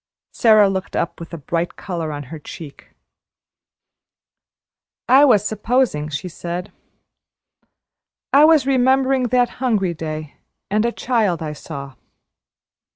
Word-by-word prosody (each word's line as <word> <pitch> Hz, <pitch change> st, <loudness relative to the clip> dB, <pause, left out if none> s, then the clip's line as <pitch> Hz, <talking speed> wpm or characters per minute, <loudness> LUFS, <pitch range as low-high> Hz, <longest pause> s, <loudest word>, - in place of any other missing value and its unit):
Sara 215 Hz, -3 st, +5 dB
looked 190 Hz, -1 st, -3 dB
up -, -, -2 dB
with 170 Hz, -, -9 dB
a 170 Hz, -, -6 dB
bright 165 Hz, +4 st, -3 dB
color 170 Hz, -5 st, -5 dB
on 145 Hz, -1 st, -5 dB
her 160 Hz, -, -7 dB
cheeks. 150 Hz, 0 st, -11 dB, 2.2 s
"I 270 Hz, +3 st, +7 dB
was 215 Hz, -7 st, +4 dB
`supposing,'" 215 Hz, -, 0 dB
she 150 Hz, +5 st, -4 dB
said; 175 Hz, +3 st, -6 dB, 1.6 s
"I 285 Hz, +2 st, +7 dB
was 315 Hz, -4 st, +5 dB
remembering 265 Hz, 0 st, +2 dB
that 245 Hz, 0 st, +2 dB
hungry 210 Hz, -8 st, +1 dB
day, 155 Hz, -2 st, -6 dB, 0.3 s
and 210 Hz, +2 st, +2 dB
a -, -, -1 dB
child 220 Hz, -10 st, 0 dB
I 150 Hz, -1 st, -4 dB
saw." 140 Hz, -2 st, -8 dB
195 Hz, 120 wpm, -20 LUFS, 160-250 Hz, 2.2 s, I